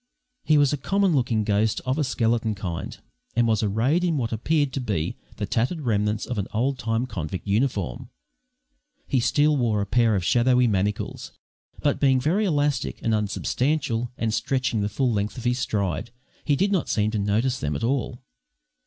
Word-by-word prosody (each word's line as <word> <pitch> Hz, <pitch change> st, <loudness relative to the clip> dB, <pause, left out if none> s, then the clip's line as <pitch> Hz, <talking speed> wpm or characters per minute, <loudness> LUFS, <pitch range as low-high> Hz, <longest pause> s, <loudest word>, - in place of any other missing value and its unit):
He 155 Hz, -, +4 dB
was 145 Hz, -1 st, +4 dB
a -, -, 0 dB
common 195 Hz, +5 st, +1 dB
looking 120 Hz, -5 st, +1 dB
ghost 105 Hz, +1 st, +1 dB
of 130 Hz, +4 st, 0 dB
a -, -, +2 dB
skeleton 115 Hz, -4 st, 0 dB
kind, 85 Hz, -4 st, -5 dB, 0.4 s
and 120 Hz, -, +3 dB
was 110 Hz, -2 st, +2 dB
arrayed 115 Hz, -, +1 dB
in 170 Hz, -4 st, +1 dB
what 120 Hz, -4 st, -2 dB
appeared 145 Hz, +4 st, 0 dB
to 135 Hz, -, -2 dB
be 100 Hz, -9 st, -2 dB, 0.2 s
the -, -, -3 dB
tattered 130 Hz, +9 st, -1 dB
remnants 105 Hz, -3 st, 0 dB
of 120 Hz, -4 st, -3 dB
an 100 Hz, -, -2 dB
old 130 Hz, +4 st, 0 dB
time 115 Hz, +1 st, -1 dB
convict 85 Hz, -6 st, -5 dB
uniform. 100 Hz, -, -1 dB, 1.0 s
He 130 Hz, -, +1 dB
still 150 Hz, +5 st, +3 dB
wore 115 Hz, -6 st, +1 dB
a 100 Hz, -, 0 dB
pair 115 Hz, +1 st, +2 dB
of 90 Hz, -3 st, -1 dB
shadowy 125 Hz, +4 st, +4 dB
manacles, 100 Hz, -2 st, -2 dB, 0.5 s
but, 145 Hz, -, +1 dB
being 135 Hz, -2 st, +4 dB
very 175 Hz, +11 st, +1 dB
elastic 145 Hz, -6 st, 0 dB
and 115 Hz, -, +1 dB
unsubstantial 120 Hz, +4 st, -1 dB
and 110 Hz, -1 st, -1 dB
stretching 130 Hz, -3 st, 0 dB
the 100 Hz, -, 0 dB
full 125 Hz, +4 st, 0 dB
length 105 Hz, +2 st, -2 dB
of 120 Hz, -, -6 dB
his 125 Hz, +1 st, +1 dB
stride, 100 Hz, -1 st, -1 dB, 0.3 s
he 145 Hz, -, +2 dB
did 195 Hz, +8 st, +1 dB
not 190 Hz, -4 st, 0 dB
seem 105 Hz, 0 st, +1 dB
to 110 Hz, -, -1 dB
notice 110 Hz, +6 st, 0 dB
them 75 Hz, 0 st, -2 dB
at 70 Hz, -, -4 dB
all. 125 Hz, 0 st, -1 dB
120 Hz, 185 wpm, -24 LUFS, 105-135 Hz, 1.0 s, He